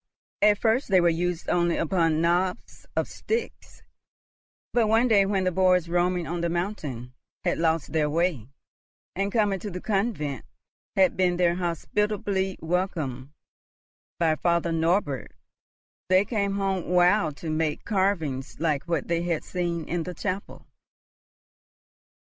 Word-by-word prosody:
At 210 Hz, -1 st, +5 dB
first 230 Hz, +5 st, +1 dB
they 190 Hz, -3 st, +4 dB
were 175 Hz, -, +2 dB
used 175 Hz, +1 st, -2 dB
only 175 Hz, -1 st, +2 dB
upon 165 Hz, -2 st, +1 dB
knobs 180 Hz, +2 st, -1 dB
of -, -, 0 dB
sticks; 455 Hz, +1 st, -5 dB, 0.9 s
but 235 Hz, -2 st, +3 dB
one 225 Hz, +3 st, +4 dB
day 200 Hz, -4 st, +4 dB
when 195 Hz, -1 st, +1 dB
the 185 Hz, -, +1 dB
boys, 180 Hz, -1 st, +3 dB
roaming 175 Hz, 0 st, +1 dB
on 170 Hz, +1 st, -3 dB
the 170 Hz, -, 0 dB
mountain, 155 Hz, -, -4 dB, 0.3 s
had -, -, 0 dB
lost 160 Hz, -3 st, 0 dB
their 155 Hz, -2 st, +2 dB
way, 160 Hz, -, 0 dB, 0.7 s
and 200 Hz, +2 st, -1 dB
coming 205 Hz, -3 st, +1 dB
to 205 Hz, -, -5 dB
the 180 Hz, -1 st, -6 dB
convent 195 Hz, -, -1 dB, 0.5 s
had 190 Hz, -2 st, +4 dB
been 180 Hz, -1 st, +2 dB
there 175 Hz, -1 st, +3 dB
hospitably 190 Hz, +2 st, -1 dB
welcomed 160 Hz, -7 st, -2 dB, 0.9 s
by 165 Hz, -2 st, +2 dB
Father 170 Hz, 0 st, +1 dB
Norbert, 165 Hz, -4 st, 0 dB, 0.8 s
they 185 Hz, +2 st, +5 dB
came 200 Hz, -3 st, -1 dB
home 195 Hz, -2 st, -1 dB
wild 180 Hz, -3 st, +3 dB
to 160 Hz, -, -4 dB
make 155 Hz, -1 st, -1 dB
carvings 175 Hz, -, -1 dB
like 150 Hz, -3 st, 0 dB
what 165 Hz, -4 st, -1 dB
they 170 Hz, 0 st, 0 dB
had 170 Hz, -2 st, -1 dB
seen 170 Hz, -3 st, -3 dB
in 175 Hz, 0 st, -1 dB
the 180 Hz, +2 st, -6 dB
chapel. 195 Hz, +3 st, -5 dB
175 Hz, 140 wpm, -26 LUFS, 165-195 Hz, 0.9 s, At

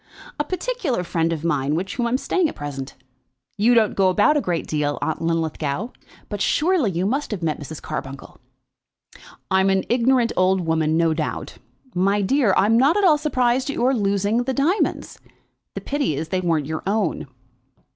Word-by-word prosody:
"A -, -, +2 dB
particular 365 Hz, -, -2 dB
friend 165 Hz, -1 st, -1 dB
of 160 Hz, -2 st, -3 dB
mine 145 Hz, -3 st, 0 dB
with 180 Hz, +4 st, -2 dB
whom 240 Hz, +1 st, -1 dB
I -, -, -1 dB
am 250 Hz, -, +1 dB
staying 340 Hz, +4 st, 0 dB
at -, -, -9 dB
present. 140 Hz, -2 st, -6 dB, 0.6 s
You 225 Hz, +4 st, +3 dB
don't 220 Hz, -3 st, +3 dB
go 190 Hz, -1 st, +3 dB
about 205 Hz, +10 st, +3 dB
a 295 Hz, -, +2 dB
great 175 Hz, -6 st, -2 dB
deal, 145 Hz, -1 st, -1 dB
Aunt 160 Hz, -, -2 dB
Linlithgow, 165 Hz, -, -2 dB, 0.4 s
but 205 Hz, -2 st, -5 dB
surely 320 Hz, -, +2 dB
you 180 Hz, 0 st, -2 dB
must 275 Hz, +8 st, -1 dB
have 200 Hz, -6 st, -4 dB
met 155 Hz, -2 st, -1 dB
Mrs. 150 Hz, +1 st, -8 dB
Carbuncle." 135 Hz, 0 st, -7 dB, 1.1 s
"I'm 190 Hz, +1 st, +3 dB
an 190 Hz, -1 st, +2 dB
ignorant 240 Hz, 0 st, +2 dB
old 185 Hz, 0 st, +2 dB
woman, 160 Hz, -1 st, +1 dB
no 165 Hz, -1 st, +2 dB
doubt. 155 Hz, -1 st, -4 dB, 0.4 s
My 195 Hz, +3 st, +1 dB
dear, 250 Hz, +1 st, +2 dB
I'm 220 Hz, +4 st, +4 dB
not 290 Hz, +9 st, +4 dB
at 410 Hz, -, +1 dB
all 310 Hz, -5 st, +5 dB
surprised 255 Hz, -3 st, +1 dB
at 280 Hz, -, -3 dB
your 255 Hz, +3 st, +2 dB
losing 200 Hz, -1 st, 0 dB
your 245 Hz, -, 0 dB
diamonds. 280 Hz, +9 st, -1 dB, 0.6 s
The -, -, -4 dB
pity 280 Hz, -, -1 dB
is 155 Hz, +3 st, -4 dB
that -, -, -26 dB
they 180 Hz, -, -4 dB
weren't 160 Hz, -4 st, +1 dB
your 155 Hz, +2 st, -4 dB
own." 205 Hz, -6 st, -1 dB
195 Hz, 185 wpm, -22 LUFS, 165-255 Hz, 1.1 s, all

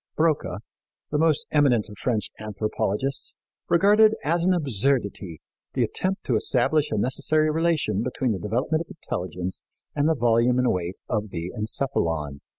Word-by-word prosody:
Broca, 155 Hz, -, 0 dB, 0.5 s
the 150 Hz, -, +1 dB
most 160 Hz, -2 st, +2 dB
eminent 130 Hz, -8 st, +3 dB
of 105 Hz, -, -11 dB
French 115 Hz, -4 st, -1 dB
anthropologists, 110 Hz, +4 st, -2 dB, 0.3 s
regarded 210 Hz, +5 st, +5 dB
as 165 Hz, +4 st, +1 dB
an 185 Hz, -, +3 dB
absurdity 120 Hz, -, -1 dB, 0.3 s
the -, -, +2 dB
attempt 190 Hz, +1 st, -2 dB
to 125 Hz, -, 0 dB
establish 145 Hz, +7 st, +1 dB
a 110 Hz, -, -1 dB
necessary 155 Hz, +7 st, +2 dB
relation 155 Hz, -, +1 dB
between 125 Hz, 0 st, -1 dB
the 100 Hz, -, -2 dB
development 125 Hz, -, -1 dB
of 170 Hz, -, -7 dB
intelligence 90 Hz, -, -4 dB, 0.3 s
and 145 Hz, +1 st, +2 dB
the 160 Hz, -, +2 dB
volume 120 Hz, 0 st, +3 dB
and 125 Hz, 0 st, +3 dB
weight 90 Hz, 0 st, -3 dB
of 105 Hz, -2 st, -2 dB
the 85 Hz, -1 st, -5 dB
encephalon. 80 Hz, -, 0 dB
125 Hz, 150 wpm, -25 LUFS, 105-155 Hz, 0.5 s, regarded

